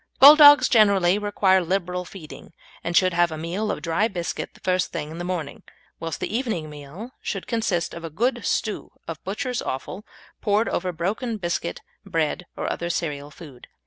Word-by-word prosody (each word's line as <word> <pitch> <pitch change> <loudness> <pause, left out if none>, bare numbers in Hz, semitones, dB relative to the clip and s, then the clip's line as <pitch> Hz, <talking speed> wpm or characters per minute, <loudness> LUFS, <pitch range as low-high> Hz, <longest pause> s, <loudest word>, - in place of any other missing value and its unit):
Bulldogs 290 +1 +9
generally 200 -4 +4
require 195 -2 +2
liberal 180 0 -2
feeding, 165 -3 -11 0.3
and 170 0 +1
should 185 -1 +4
have 175 0 +3
a 155 - -5
meal 180 +7 -3
of - - -3
dry 175 +6 +1
biscuit 175 -6 -5
the - - -17
first 185 -1 0
thing 155 -2 -5
in 165 - -8
the - - -3
morning, 175 -5 -4 0.4
whilst 165 -2 -4
the - - -3
evening 215 - -2
meal 150 - -9
should 195 - -4
consist 220 -8 -1
of 170 - -8
a 165 - -5
good 240 - -1
stew 215 -2 -2
of 165 -2 -7
butcher's 245 +6 -3
offal 180 +9 -5 0.4
poured 210 +2 +2
over 180 +1 -1
broken 210 +8 -2
biscuit, 170 -2 -3 0.2
bread, 165 +2 -2
or - - -3
other 170 - -4
cereal 145 -4 -3
food. 145 -5 -13
180 Hz, 175 wpm, -24 LUFS, 165-210 Hz, 0.4 s, Bulldogs